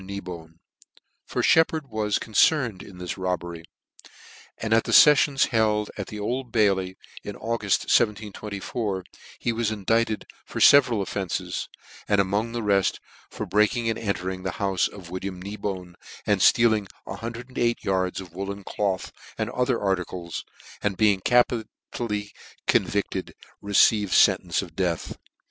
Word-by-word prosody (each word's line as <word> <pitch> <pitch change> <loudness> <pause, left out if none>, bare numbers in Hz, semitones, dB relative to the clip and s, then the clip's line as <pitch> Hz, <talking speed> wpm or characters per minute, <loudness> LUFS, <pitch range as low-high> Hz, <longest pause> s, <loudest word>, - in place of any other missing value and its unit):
Kneebone; 90 -4 -8 0.7
tor - - -1
Sheppard 160 -1 +3
was 110 -3 0
concerned 115 - +2
m 95 - -13
this 90 +1 -5
robbery, 85 -2 -3 0.9
and 110 0 -1
at 115 - +3
the - - -3
ieffions 145 -2 +6
held 105 -2 +1
ac 100 - -4
the 105 - -7
Old 125 +4 -3
Bailey 95 -4 +1 0.3
in 105 - -6
Auguft, 110 -3 0
1724, 105 -2 -1 0.3
he 120 - -1
was 115 -1 0
indicted 110 +1 0 0.2
for - - -6
fe 140 - +9
veral 120 -7 -1
offences, 95 -2 -3 0.4
and 105 - +3
among 100 +4 0
the 120 -1 -3
reft, 100 -2 +2 0.3
for - - -5
breaking 115 +3 +2
and 110 - -4
entering 95 -3 -3
the 95 -1 -3
hoiffe 95 -3 0
of 90 -4 -12
William 95 0 -5
Kneebone, 95 -2 -5 0.3
and 105 -3 +2
ftealing 110 -3 +4 0.2
108 120 +3 -3
yards 95 -1 0
of 90 -3 -10
woollen 100 +2 -5
cloth, 95 -1 -2 0.3
and - - -2
other 125 0 0
articles, 90 -3 -3 0.4
and 100 -3 -1
being 105 -3 +4
capitally 110 -2 0 0.3
convicted, - - 0 0.3
received 100 0 +3
ientence 95 -2 +4
of 85 -4 -12
death. 90 -3 -2
105 Hz, 135 wpm, -25 LUFS, 95-115 Hz, 0.9 s, fe